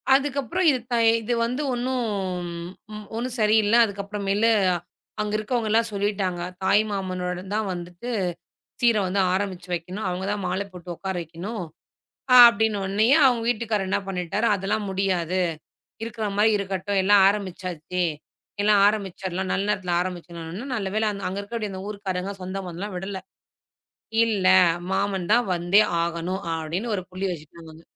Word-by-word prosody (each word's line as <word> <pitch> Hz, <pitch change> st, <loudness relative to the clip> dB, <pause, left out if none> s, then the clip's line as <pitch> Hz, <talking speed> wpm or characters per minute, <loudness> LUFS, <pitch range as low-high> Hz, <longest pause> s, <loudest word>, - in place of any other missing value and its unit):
அதுக்கப்புறம் 280 Hz, +5 st, +1 dB
இது 265 Hz, -3 st, +2 dB
தை 235 Hz, -, +3 dB, 0.2 s
இதுவந்து 235 Hz, +3 st, 0 dB
ஒன்னும் 250 Hz, 0 st, -1 dB, 1.1 s
ஒன்னும் 240 Hz, +2 st, -3 dB
சரியில்ல. 215 Hz, 0 st, +4 dB
அதுக்கப்றமேலு, 200 Hz, +1 st, -1 dB, 0.7 s
அங்க 210 Hz, 0 st, -2 dB
இருக்கறவங்க 220 Hz, +1 st, -1 dB
எல்லா 225 Hz, +1 st, +5 dB
சொல்லிட்டாங்க. 200 Hz, -3 st, -1 dB, 0.2 s
தாய் 205 Hz, +3 st, +4 dB
மாமனோட 180 Hz, -2 st, -3 dB
தான் 215 Hz, -1 st, 0 dB
வந்துட்டு 175 Hz, +6 st, -7 dB, 0.7 s
சீர 235 Hz, -2 st, +5 dB
வந்து 190 Hz, +2 st, 0 dB
ஆரம்பிச்சு 190 Hz, -2 st, -3 dB
வைக்கணும். 180 Hz, +5 st, -4 dB
அவங்க 180 Hz, +1 st, -3 dB
தா 205 Hz, -, 0 dB
மால 190 Hz, -, -1 dB
போட்டு 180 Hz, -1 st, -8 dB
உக்கார 190 Hz, -1 st, -4 dB
வைக்கணும். 175 Hz, +5 st, -6 dB, 0.8 s
அப்படின்ன 220 Hz, -3 st, +6 dB
உடனயே 210 Hz, +7 st, +3 dB
அவங்க 245 Hz, -3 st, +2 dB
வீட்டுக்கார் 220 Hz, -4 st, 0 dB
என்ன 195 Hz, +2 st, +1 dB
பண்ணிட்டாரு, 190 Hz, +4 st, -1 dB
அதெல்லாம் 200 Hz, +2 st, -1 dB
முடியாது. 185 Hz, -2 st, 0 dB, 0.6 s
இருக்கிற 225 Hz, -1 st, -3 dB
மாதிரி 215 Hz, +2 st, +4 dB
இருக்கட்டும். 195 Hz, 0 st, -1 dB
எல்லா 205 Hz, +2 st, +5 dB
ஆரம்பிச்சாச்சு. 180 Hz, -3 st, -3 dB, 0.6 s
எல்லா 210 Hz, +1 st, +4 dB
ஆரம்பிச்சிரலாம், 190 Hz, -3 st, -3 dB
நல்ல 195 Hz, -, 0 dB
நேரத்துல 185 Hz, -3 st, -1 dB
ஆரம்பிச்சோம். 175 Hz, -2 st, -5 dB, 0.4 s
நல்லவேள 210 Hz, +1 st, -1 dB, 0.2 s
அங்க 190 Hz, +2 st, -4 dB
இருக்கிற 215 Hz, +1 st, -4 dB
இந்த 190 Hz, -1 st, -6 dB
ஊர்க்காரங்க 195 Hz, -2 st, -3 dB
சொந்தம் 190 Hz, +1 st, -5 dB
பந்தல்லாம் 185 Hz, +4 st, -6 dB
விடல. 190 Hz, +1 st, -5 dB, 1.1 s
இல்ல, 205 Hz, -5 st, +1 dB, 0.4 s
மாமன் 190 Hz, -2 st, 0 dB
தா 230 Hz, -, +7 dB, 0.2 s
வந்தே 175 Hz, +4 st, +4 dB, 0.2 s
ஆகணும் 170 Hz, +3 st, -3 dB
அப்படின்னு 170 Hz, +8 st, -3 dB
ஒரு 190 Hz, -, -2 dB
புள்ளி 185 Hz, +2 st, -3 dB
வச்சுட்டாங்க. 160 Hz, 0 st, -10 dB
195 Hz, 130 wpm, -24 LUFS, 180-215 Hz, 1.1 s, தா